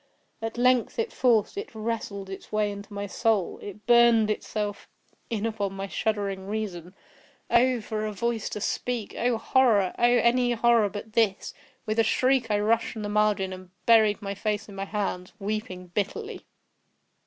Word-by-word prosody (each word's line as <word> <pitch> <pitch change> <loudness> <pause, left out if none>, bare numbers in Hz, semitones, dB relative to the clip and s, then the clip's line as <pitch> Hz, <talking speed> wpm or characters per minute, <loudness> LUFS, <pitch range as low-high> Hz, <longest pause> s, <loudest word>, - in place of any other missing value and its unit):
At 225 +1 -4
length 250 -1 +2
it 460 -1 -1
forced—it 250 - +1
wrestled 215 -3 -4
its 190 0 -9
way 215 -1 +1
into 200 +1 -9
my 200 0 -4
soul—it 205 -1 -1
burned 235 -2 +5
itself 210 -1 -4 0.4
in 225 -2 -2
upon 205 -3 -2
my 195 0 -4
shuddering 200 -2 -2
reason. 195 -4 -4 0.6
Oh! 250 0 +4
for 215 0 -3
a - - -3
voice 225 +2 -2
to 210 - -5
speak!—oh! 240 +1 -1
horror!—oh! 225 -6 +2
any 240 0 +4
horror 235 -2 +3
but 210 +2 -8
this! 215 -4 +1 0.3
With 215 +1 -1
a - - +6
shriek, 255 +1 +2
I 205 -1 +2
rushed 220 +2 +1
from 220 - -6
the 205 - -3
margin, 205 -2 +1
and 185 -1 -10 0.2
buried 220 -3 +4
my 200 0 -3
face 210 +1 -2
in 205 - -11
my 195 0 -4
hands—weeping 195 -1 -4
bitterly. 415 - -3
215 Hz, 155 wpm, -26 LUFS, 200-235 Hz, 0.6 s, a